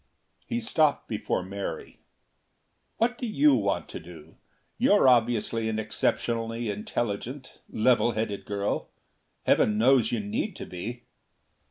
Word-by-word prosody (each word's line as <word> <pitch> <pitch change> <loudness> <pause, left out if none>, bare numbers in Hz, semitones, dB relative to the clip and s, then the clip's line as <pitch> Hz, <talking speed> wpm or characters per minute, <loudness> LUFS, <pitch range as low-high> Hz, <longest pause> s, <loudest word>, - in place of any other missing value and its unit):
He 235 - -1
stopped 155 -11 +1
before 105 -4 -2
Mary. 100 +1 -6 1.0
"What 240 +2 +1
do 245 - -2
you 150 -8 +4
want 100 -6 0
to - - -6
do? 80 -2 -13 0.4
You're - - +5
obviously 115 -2 +2
an 110 - -2
exceptionally 115 +1 -1
intelligent, 115 +5 -4
level 120 +1 +3
headed 110 -2 -3
girl. 100 0 -2 0.5
Heaven 105 -1 +3
knows 120 0 +4
you 120 - 0
need 105 0 -3
to - - -7
be." 115 +7 -7
115 Hz, 125 wpm, -27 LUFS, 105-125 Hz, 1.0 s, You're